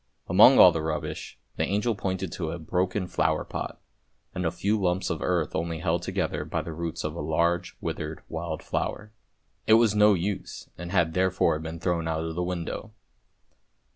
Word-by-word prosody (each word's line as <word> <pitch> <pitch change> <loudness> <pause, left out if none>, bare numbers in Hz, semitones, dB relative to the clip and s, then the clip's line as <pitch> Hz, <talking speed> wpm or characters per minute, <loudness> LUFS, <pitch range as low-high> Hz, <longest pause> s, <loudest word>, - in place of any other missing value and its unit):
Among - - +7
all - - +10
the 80 - -2
rubbish, 80 -1 -4 0.2
the - - +1
angel 105 +4 +1
pointed 95 -3 -3
to 85 -2 -3
a 85 - -4
broken 90 +4 -1
flower - - 0
pot - - -6 0.5
and 90 -1 -1
a - - 0
few 100 +5 0
lumps 90 0 0
of 80 - -3
earth 90 -4 0
only 85 0 -2
held 85 0 0
together - - -2
by - - -3
the 80 - -6
roots 85 0 -4
of - - -2
a - - -5
large 85 +1 0
withered 80 -1 -4
wild 80 -1 -4
flower. 105 +1 -3 0.6
It 110 - +6
was 115 -2 +4
no 105 -1 +5
use 95 +2 -4
and 85 +1 -7
had 85 -4 +2
there 95 +1 +3
fore 90 -4 +1
been 80 +1 -6
thrown 85 -2 -1
out 80 0 -1
of 80 - -4
the 90 - -2
window. 90 +4 -4
85 Hz, 190 wpm, -27 LUFS, 80-95 Hz, 0.6 s, all